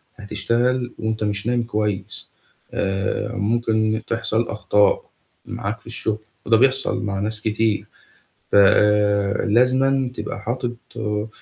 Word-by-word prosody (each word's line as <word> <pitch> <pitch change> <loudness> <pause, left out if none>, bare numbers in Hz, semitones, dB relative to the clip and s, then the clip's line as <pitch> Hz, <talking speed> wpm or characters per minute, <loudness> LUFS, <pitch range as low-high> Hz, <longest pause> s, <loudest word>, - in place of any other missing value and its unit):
هتشتغل 120 +4 -1
وأنت 110 0 -2
مش 105 0 -2
نايم 120 0 +1
كويس. 105 -3 -3 0.4
آآ 95 +2 -1
ممكن 110 0 +1
تحصل 115 0 0
أخطاء 105 -1 +2 0.4
معاك 105 +3 -4
في - - -20
الشغل، 110 -2 -2 0.3
وده 115 - +5
بيحصل 135 -1 +2
مع 100 -2 -2
ناس 110 +2 -2
كتير. 110 -1 0 0.7
ف - - +1 0.9
لازمًا 130 +3 +3
تبقى 105 -2 -5
حاطط، 120 +2 -3 0.2
آآ 105 -1 -2
110 Hz, 115 wpm, -22 LUFS, 105-120 Hz, 0.9 s, وده